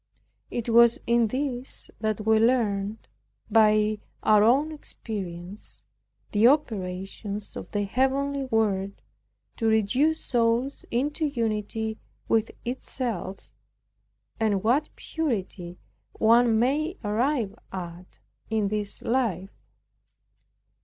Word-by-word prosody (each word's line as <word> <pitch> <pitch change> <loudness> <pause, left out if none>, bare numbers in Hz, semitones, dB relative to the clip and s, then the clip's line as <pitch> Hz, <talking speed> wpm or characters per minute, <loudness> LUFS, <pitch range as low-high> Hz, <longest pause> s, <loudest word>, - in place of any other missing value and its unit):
It 240 -1 -4
was 235 +3 +6
in 235 -1 +3
this 260 +1 -3
that 215 -1 -2
we 220 0 +4
learned, 220 -3 +1 0.4
by 215 -1 +4 0.2
our 210 -1 +5
own 275 +8 +4
experience, 195 - -7 0.5
the 215 +3 +5
operations 200 -5 -1
of - - -7
the 205 -1 -1
heavenly 270 +5 0
Word 200 -5 0 0.6
to 225 - 0
reduce 245 +9 +2
souls 240 +3 +1
into 290 +6 0
unity 220 -3 -2 0.3
with 225 0 +2 0.2
itself, 240 -5 -4 0.9
and 205 -3 +1
what 265 +7 +2
purity 195 - -3 0.4
one 230 0 +4
may 300 - +1
arrive 225 0 0 0.2
at 180 -1 -8 0.3
in 215 -2 +1
this 210 -1 -3
life. 220 -7 0
225 Hz, 100 wpm, -26 LUFS, 205-255 Hz, 0.9 s, was